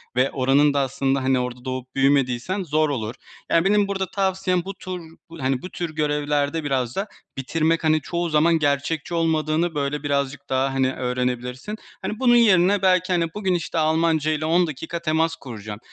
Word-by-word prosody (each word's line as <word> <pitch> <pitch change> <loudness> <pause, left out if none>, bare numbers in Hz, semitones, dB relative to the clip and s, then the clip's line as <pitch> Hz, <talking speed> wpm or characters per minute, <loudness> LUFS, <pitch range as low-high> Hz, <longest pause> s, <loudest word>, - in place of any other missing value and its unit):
ve 130 +2 +2
oranın 140 +2 +3
da 140 - +1
aslında, 135 0 0
hani, 130 0 +2
orada 125 0 -5
doğup 130 0 -5
büyümediysen 135 +6 +1
zor 155 -1 +1
olur. 115 -4 -3 0.3
Yani, 165 +1 +3
benim 205 0 +3
burada 190 -1 -3
tavsiyem 190 -2 0
bu 195 - -5
tur, 185 -1 -7 0.4
hani, 130 -1 0
bu 180 - -7
tür 170 -4 -5
görevlerde 150 0 0
biraz 130 -4 -1
da 195 +2 -2 0.3
bitirmek, 160 +5 0
hani, 155 0 +3
çoğu 175 +2 -2
zaman 160 +2 +3
gerçekçi 145 +3 -1
olmadığını, 160 0 +1
böyle, 145 0 -2
birazcık 140 -1 -2
daha, 135 +1 +1
hani, 130 -1 +1
öğrenebilirsin. 125 - -3 0.3
Hani, 215 - -4
bunun 245 -2 +5
yerine, 200 -4 +5
belki, 185 -1 +3
hani, 170 -1 +2
bugün, 190 -3 -1
işte, 170 0 -3
Almanca 160 -1 +2
ile 155 0 -1
10 170 +3 +3
dakika 160 +3 -5
temas 160 0 +1
kuracağım 110 -5 -8
155 Hz, 175 wpm, -23 LUFS, 135-175 Hz, 0.4 s, bunun